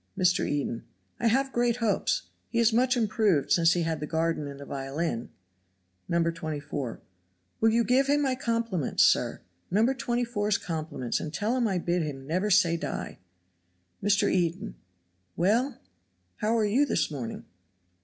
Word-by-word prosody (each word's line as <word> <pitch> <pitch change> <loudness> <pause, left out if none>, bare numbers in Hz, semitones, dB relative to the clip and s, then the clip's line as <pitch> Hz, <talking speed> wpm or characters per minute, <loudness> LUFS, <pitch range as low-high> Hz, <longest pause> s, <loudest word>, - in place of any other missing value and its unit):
Mr. 180 0 +2
Eden. 140 -5 -2 0.4
"I 235 - +2
have 265 +4 +2
great 240 -1 +2
hopes; 230 -4 0 0.3
he 235 - -3
is 230 -1 +4
much 255 +2 +3
improved 215 - +1
since 165 -1 +5
he 175 - 0
had 160 -1 -1
the 150 - -4
garden 160 -2 -1
and 140 0 -8
the 140 - -8
violin." 135 -2 -3 0.8
No. 170 0 +2
24. 150 -6 -4 0.6
"Will 225 - +4
you 230 +1 +3
give 260 +3 +3
him 290 +1 +3
my 265 -2 +1
compliments, 230 - 0
sir? - - +2 0.3
No. 210 +5 +3
24's 240 -5 0
compliments 155 -7 -3
and 155 - -5
tell 210 +9 -1
him 245 -3 +1
I 190 -3 0
bid 175 0 0
him 140 -4 -5
'never 180 +8 0
say 175 -4 +4
die'?" - - -5 0.8
Mr. 205 0 +3
Eden. 170 - 0 0.6
"Well,, 225 +10 +1 0.6
how 220 +2 +1
are 220 - +2
you 230 +8 +3
this 280 - 0
morning?" 125 -6 -6
185 Hz, 155 wpm, -28 LUFS, 160-235 Hz, 0.8 s, since